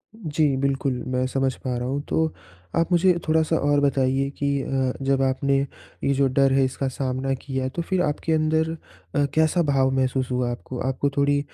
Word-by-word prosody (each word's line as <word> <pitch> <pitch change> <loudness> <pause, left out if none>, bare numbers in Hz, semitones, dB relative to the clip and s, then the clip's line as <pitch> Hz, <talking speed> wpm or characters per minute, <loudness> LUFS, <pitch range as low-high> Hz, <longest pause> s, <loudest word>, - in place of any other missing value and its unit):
जी, 155 -8 0
बिल्कुल, 135 0 0
मैं 130 0 0
समझ 135 0 0
पा 125 -2 -2
रहा 120 +1 -3
हूँ 140 +2 -1
तो 160 - +2 0.5
आप 165 +2 +1
मुझे 180 +1 +5
थोड़ा-सा 160 +1 +2
और 145 -2 +2
बताइए 135 -1 +1
कि 140 - -1
अ, 135 -1 0
जब 135 0 +2
आपने 135 +1 +1 0.5
ये 140 - +2
जो 135 0 +3
डर 135 +1 +3
है 135 0 +4
इसका 135 +1 -2
सामना 130 0 -2
किया, 130 -1 -2
तो 170 - -4
फिर 185 +2 0
आपके 155 0 0
अंदर 160 +1 +1
अ, 150 -2 -4
कैसा 160 +2 +3
भाव 135 -3 +2
महसूस 130 -1 0
हुआ 125 -1 0
आपको? 125 +1 -6
आपको 135 +2 0
थोड़ी 145 0 +3
135 Hz, 185 wpm, -24 LUFS, 130-155 Hz, 0.5 s, मुझे